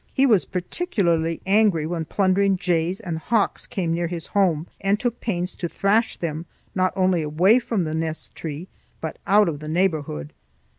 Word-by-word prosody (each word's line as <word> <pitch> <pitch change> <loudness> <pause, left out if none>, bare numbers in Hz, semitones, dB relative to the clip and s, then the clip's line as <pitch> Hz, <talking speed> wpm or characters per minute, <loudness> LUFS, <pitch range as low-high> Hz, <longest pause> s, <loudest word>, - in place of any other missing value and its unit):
He 270 - +4
was 215 -8 +4
particularly 175 - -1
angry 195 -5 +3
when 165 0 -3
plundering 195 +2 +2
jays 180 0 0
and 165 -3 -4
hawks 215 +4 0
came 170 -4 -2
near 170 0 0
his 170 -1 -5
home, 175 -6 +1 0.2
and 200 +1 +1
took 245 -2 -2
pains 180 -5 -2
to 175 - -4
thrash 215 +6 +1
them 165 0 -4 0.3
not 185 0 +1
only 185 -3 +2
away 175 +10 +4
from 225 -6 -1
the 155 -1 -3
nest 160 0 -3
tree 160 +2 -6 0.3
but 160 - -5
out 205 +1 +5
of 150 -4 -2
the 155 +1 -7
neighborhood. 155 - -1
180 Hz, 170 wpm, -23 LUFS, 160-200 Hz, 0.3 s, out